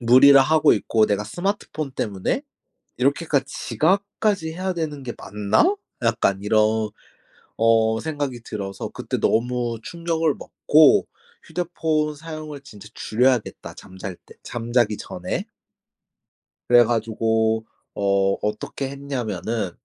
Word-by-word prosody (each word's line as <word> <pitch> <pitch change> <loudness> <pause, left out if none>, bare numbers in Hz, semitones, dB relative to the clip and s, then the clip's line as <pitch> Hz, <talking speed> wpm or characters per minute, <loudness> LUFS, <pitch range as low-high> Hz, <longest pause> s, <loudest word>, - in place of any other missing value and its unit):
무리라 130 +3 +7
하고 155 +2 +4
있고 110 +1 +2
'내가 105 0 0
스마트폰 175 - -3
때문에 105 - -2 0.6
이렇게까지 140 +1 +1
지각까지 195 +4 0
해야 185 +2 -2
되는 155 -4 -4
게 125 -2 -5
맞나?' 105 - +1 0.3
약간 115 -4 +1
이런 110 +1 +3 1.0
어 110 0 +3
생각이 145 -6 -3
들어서 100 -4 -5
그때 - - -4
너무 120 0 0
충격을 165 -1 -1
먹고 155 0 +4 0.4
휴대폰 160 -3 -1
사용을 155 -2 -8
진짜 105 -6 -13
줄여야겠다, 125 +1 0
잠잘 95 0 -8
때 - - -16
잠자기 120 -2 0
전에. - - -4 1.2
그래 120 -1 +7
가지고 110 -1 0 0.3
어 100 -1 +2
어떻게 105 +6 -3
했냐면은 120 -7 -3
125 Hz, 260 characters per minute, -23 LUFS, 110-155 Hz, 1.2 s, 무리라